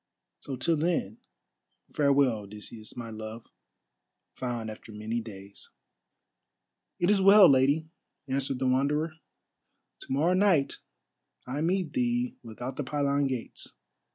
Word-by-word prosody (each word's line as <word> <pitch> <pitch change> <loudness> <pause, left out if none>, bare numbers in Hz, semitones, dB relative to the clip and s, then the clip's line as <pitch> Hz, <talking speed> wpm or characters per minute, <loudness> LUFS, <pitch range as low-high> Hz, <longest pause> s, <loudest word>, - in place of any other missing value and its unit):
So 135 - -6
till 160 +6 +1
then, 150 - -1 0.7
farewell, 140 -5 +3
Odysseus, 105 +3 -11
my 115 -2 -6
love, 110 +1 -7 0.9
found 120 -3 -4
after 110 +1 -11
many 110 +2 -3
days." 100 -3 -11 1.3
"It 175 +3 +2
is 200 -2 +3
well, 195 0 +9
Lady," 140 +4 +3 0.4
answered 135 0 -1
the 130 - -2
Wanderer. 145 +5 +1 0.9
"To - - -11
morrow 155 +7 +2
night 185 -7 +2 0.7
I 135 +4 -3
meet 180 +1 0
thee 245 -1 0
without 120 +3 -7
the 145 - -1
pylon 140 0 +1
gates. 130 -3 -5
135 Hz, 120 wpm, -28 LUFS, 115-160 Hz, 1.3 s, well